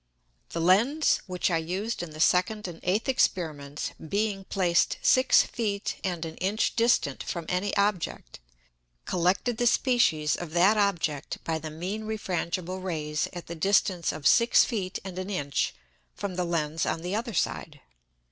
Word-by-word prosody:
The 165 - -4
Lens 225 - +3
which 180 0 -1
I 165 - +2
used 190 +8 -3
in 175 - -5
the 155 0 -11
second 185 +5 +2
and 170 -2 -8
eighth 195 +5 0
Experiments, 155 - -1
being 200 +3 -2
placed 180 -4 +1
six 255 0 +5
Feet 205 -3 -3
and 175 -4 -2
an 160 0 -8
Inch 200 +4 0
distant 230 - +2
from 170 -2 -4
any 185 +3 -1
Object, 200 - -1 0.7
collected 185 +7 +1
the 240 0 +2
Species 170 - +2
of 170 -3 -7
that 185 +5 +5
Object 175 -8 0
by 160 -1 -2
the 155 0 -6
mean 185 +8 -5
refrangible 185 -3 -3
Rays 150 -4 -2
at 175 -1 -8
the 170 - -7
distance 185 0 +1
of 145 - -8
six 235 0 +5
Feet 195 -5 -3
and 185 -1 -6
an 185 +1 -5
Inch 145 -8 -1 0.4
from 200 -2 -4
the 180 0 -1
Lens 160 -2 -1
on 165 - -1
the 180 +3 -2
other 230 -1 -3
side. - - -2
185 Hz, 160 wpm, -27 LUFS, 165-205 Hz, 0.7 s, six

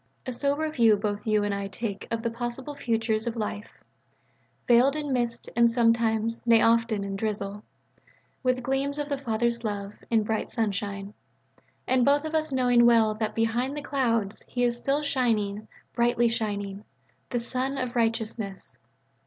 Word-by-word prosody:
A 255 - -3
sober 285 +5 0
view 230 -7 +5
both 205 +1 -3
you 215 -1 +3
and 205 0 0
I 200 0 -3
take 200 0 -5
of 230 0 -2
the 230 - -1
possible 240 +4 -5
futures 225 -4 -1
of 235 - -2
life: 210 -1 -5 0.8
veiled 250 +4 +5
in 295 -3 -2
mist 235 -2 -1
and 235 0 +5
sometimes, 230 -1 +2
nay 230 -1 +5
often, 230 -2 +2
in 195 0 -4
drizzle: 205 -1 -3 0.8
with 255 -1 0
gleams 270 +2 -1
of 295 0 -3
the 280 -1 -1
Father's 235 -1 -1
love, 205 -2 -3 0.2
in 225 -2 +3
bright 220 +1 -2
sunshine: 200 -2 -2 0.7
and 255 -1 +3
both 285 +3 +3
of 315 - -4
us 310 -1 0
knowing 245 -2 +4
well 225 -2 +5
that 215 0 -3
"behind 235 +5 0
the 295 - -5
clouds" 230 -8 0
He 245 - -1
is 240 -1 +2
still 275 +5 0
shining, 215 -7 0 0.3
brightly 240 0 +2
shining: 205 -3 -3 0.5
the 245 - -1
Sun 255 +3 -2
of 255 -1 -3
Righteousness. 225 -3 -2
230 Hz, 160 wpm, -27 LUFS, 215-255 Hz, 0.8 s, view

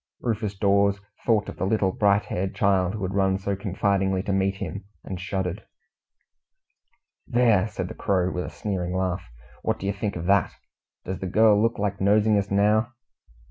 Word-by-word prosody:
Rufus 110 -4 -2
Dawes 100 0 +3 0.3
thought 110 -3 +3
of - - -7
the - - -1
little 100 -2 +2
bright 100 +1 +2
haired 95 +1 -3
child 95 -1 +2
who 105 - -5
had 95 +1 -2
run 95 -1 +2
so 100 +1 -2
confidingly 95 -1 0
to 100 - -1
meet 95 0 +1
him, 100 0 -6 0.2
and 95 -2 -6
shuddered. 95 +1 -3 1.6
"There!" 115 -5 +3
said 95 -4 -4
the - - -7
Crow, 95 -3 0
with 90 - -3
a - - -6
sneering 90 -3 -3
laugh, 95 0 -1 0.4
"what - - -1
do - - -7
you 100 - 0
think 100 +1 -3
of 85 -1 -5
that? 100 +1 +2 0.5
Does 95 0 -4
the 95 - -4
girl 105 +2 +4
look 115 +1 +1
like 100 -1 -2
nosing 105 +2 +4
us 100 0 -3
now?" 105 +3 +2
100 Hz, 180 wpm, -25 LUFS, 95-105 Hz, 1.6 s, girl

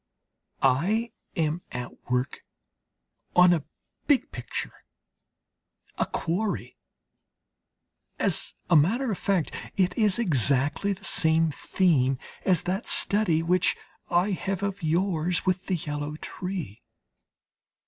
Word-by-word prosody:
I 190 - +2 0.2
am 160 -1 0
at 125 0 -8
work 125 +2 -1 1.0
on 180 0 +7
a 160 -4 -1 0.4
big 285 -3 +2
picture, - - -6 1.2
a - - +1
quarry. 195 +5 -2 1.4
As - - 0 0.2
a - - +7
matter 225 - +3
of 195 - -3
fact 190 -6 0 0.3
it 180 -2 +2
is 210 -4 +3
exactly 145 - +2
the 195 +1 -11
same 160 -2 +3
theme 140 -6 +1 0.3
as 180 -4 +3
that 185 +3 -2
study 190 -6 +3
which 180 +2 +2 0.3
I 180 +4 +2
have 195 +1 -3
of 200 0 -3
yours 170 +1 0
with 185 0 0
the 190 - +1
yellow 150 -2 -4
tree. 175 - -6
175 Hz, 110 wpm, -26 LUFS, 155-195 Hz, 1.4 s, on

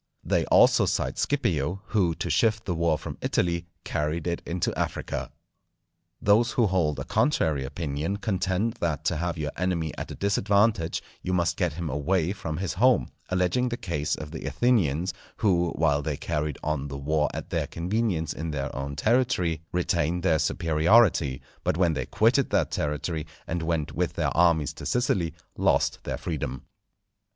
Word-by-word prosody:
They - - +1
also - - +5
cite - - -1
Scipio, 85 +6 0
who 90 -7 +2
to 85 - -3
shift 110 +8 +2
the 90 - -1
war 85 -2 +1
from - - -7
Italy, 85 -1 0 0.2
carried 75 +2 -2
it 85 -1 -1
into 85 0 -1
Africa. - - -3 0.9
Those 110 +4 +3
who 120 - +3
hold 90 -7 +1
a - - -3
contrary 80 - +1
opinion 75 +5 -3
contend 100 +2 -1
that 80 -2 -1
to 85 - +1
have 85 +1 -2
your 75 -2 -2
enemy 85 -3 -1
at - - -5
a - - -6
disadvantage 100 -2 +1 0.2
you 90 - -2
must 85 -1 +1
get 85 -4 0
him 85 +1 -4
away 80 +5 0
from 80 -6 -5
his 95 -1 -2
home, 125 +6 +3 0.2
alleging 95 +7 +1
the 120 - -3
case 75 -7 -2
of 75 -1 -8
the 80 - -6
Athenians, 90 - +1 0.2
who 90 -5 +2
while 75 -3 +2
they 75 -1 -3
carried 75 -1 -2
on 75 -2 -1
the 70 -1 -6
war 75 +2 +1
at - - -7
their - - 0
convenience 90 -2 -1
in 80 +2 -4
their 70 -3 -3
own 70 +1 -4
territory, 105 - +1
retained 85 -1 0
their 80 -4 +3
superiority; 80 - +3 0.2
but - - 0
when 85 -3 +3
they 65 -3 -3
quitted - - +3
that - - +1
territory, 75 +2 -2 0.2
and 85 0 -2
went 80 -2 -1
with - - -1
their - - -1
armies 85 -3 +3
to - - -10
Sicily, 95 -9 +1 0.2
lost - - +2
their - - -2
freedom. 70 -6 -4
85 Hz, 170 wpm, -26 LUFS, 75-95 Hz, 0.9 s, also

